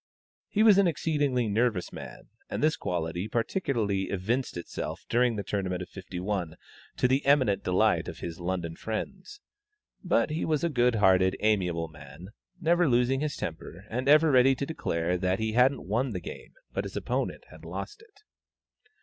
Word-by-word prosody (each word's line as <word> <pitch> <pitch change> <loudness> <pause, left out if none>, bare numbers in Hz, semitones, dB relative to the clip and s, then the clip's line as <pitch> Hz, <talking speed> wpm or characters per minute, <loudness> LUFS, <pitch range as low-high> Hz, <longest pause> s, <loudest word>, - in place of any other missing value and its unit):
He 215 - +2
was 210 -3 +7
an 195 - +5
exceedingly 145 -6 0
nervous 110 -3 0
man, - - -10 0.2
and - - -3
this 155 +1 +3
quality 85 +2 -3
particularly 115 - -1
evinced 110 +5 -1
itself 85 - -6
during 120 0 +2
the 100 - -3
Tournament 90 -2 -2
of - - -12
'51, 90 -2 -4 0.4
to - - +3
the 130 +2 +1
eminent 130 -8 +3
delight 90 0 +2
of - - -6
his 85 0 -6
London 85 -2 -3
friends. 190 - -6 0.6
But - - +2
he 155 - -2
was 155 -2 0
a 170 - +2
good 125 -4 +2
hearted, 95 -2 +4
amiable 90 -6 +1
man, 75 +3 -12 0.3
never 175 -1 +3
losing 125 +2 +2
his 150 0 -2
temper, 85 +3 -6
and 130 +4 -1
ever 155 +1 +6
ready 130 +1 +5
to 140 - -3
declare 90 - -1
that 95 +1 +1
he 110 0 -1
hadn't 125 +4 +3
won 120 +4 0
the 90 - -3
game, 85 - -9 0.2
but - - -1
his - - -6
opponent - - -2
had - - -14
lost 420 +1 -6
it. 430 -2 -22
115 Hz, 170 wpm, -28 LUFS, 90-140 Hz, 0.6 s, was